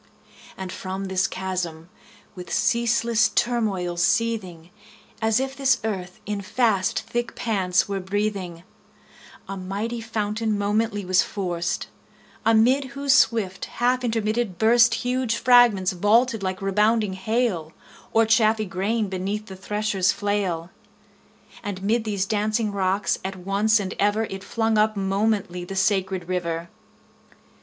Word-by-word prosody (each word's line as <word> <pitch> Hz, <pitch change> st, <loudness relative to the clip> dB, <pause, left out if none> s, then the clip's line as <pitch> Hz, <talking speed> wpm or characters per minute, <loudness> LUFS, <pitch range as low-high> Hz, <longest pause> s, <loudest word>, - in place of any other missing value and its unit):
And 190 Hz, -1 st, -6 dB
from 190 Hz, +1 st, -5 dB
this 190 Hz, 0 st, +1 dB
chasm, 180 Hz, -3 st, -4 dB, 0.4 s
with 180 Hz, -3 st, -9 dB
ceaseless 235 Hz, -1 st, +2 dB
turmoil 205 Hz, -8 st, 0 dB
seething, 180 Hz, -3 st, 0 dB, 0.5 s
As 220 Hz, +1 st, +2 dB
if 270 Hz, 0 st, -3 dB
this 270 Hz, -1 st, +2 dB
earth 190 Hz, -5 st, -4 dB
in 205 Hz, -1 st, -3 dB
fast 200 Hz, -2 st, +1 dB
thick 235 Hz, +2 st, -3 dB
pants 190 Hz, -5 st, +1 dB
were 200 Hz, -1 st, -2 dB
breathing, 190 Hz, -3 st, -3 dB, 0.8 s
A 195 Hz, -, -5 dB
mighty 200 Hz, +5 st, -4 dB
fountain 215 Hz, -1 st, -2 dB
momently 205 Hz, 0 st, 0 dB
was 185 Hz, 0 st, +4 dB
forced; 175 Hz, -2 st, -3 dB, 0.6 s
Amid 235 Hz, +5 st, +4 dB
whose 275 Hz, +1 st, 0 dB
swift 220 Hz, -7 st, +2 dB
half 250 Hz, +1 st, 0 dB
intermitted 225 Hz, -3 st, -1 dB
burst 230 Hz, +3 st, +5 dB
20 225 Hz, -, -1 dB
Huge 250 Hz, -2 st, 0 dB
fragments 240 Hz, -7 st, +5 dB
vaulted 220 Hz, +5 st, +2 dB
like 190 Hz, 0 st, -3 dB
rebounding 210 Hz, +1 st, +2 dB
hail, 190 Hz, -5 st, -1 dB, 0.4 s
Or 225 Hz, 0 st, +4 dB
chaffy 220 Hz, -1 st, +3 dB
grain 205 Hz, +4 st, -1 dB
beneath 195 Hz, +3 st, -3 dB
the 190 Hz, -, -9 dB
thresher's 195 Hz, -1 st, 0 dB
flail: 190 Hz, -4 st, -2 dB, 0.9 s
And 200 Hz, -3 st, -5 dB
'mid 225 Hz, +3 st, +1 dB
these 200 Hz, -3 st, -1 dB
dancing 215 Hz, +1 st, 0 dB
rocks 195 Hz, 0 st, 0 dB
at 190 Hz, 0 st, -4 dB
once 200 Hz, +4 st, +1 dB
and 190 Hz, -2 st, -3 dB
ever 205 Hz, +2 st, +2 dB
It 195 Hz, 0 st, -6 dB
flung 225 Hz, +1 st, 0 dB
up 215 Hz, 0 st, +2 dB
momently 195 Hz, -2 st, 0 dB
the 195 Hz, +2 st, -7 dB
sacred 190 Hz, -2 st, 0 dB
river. 170 Hz, -2 st, -3 dB
205 Hz, 130 wpm, -24 LUFS, 190-225 Hz, 0.9 s, burst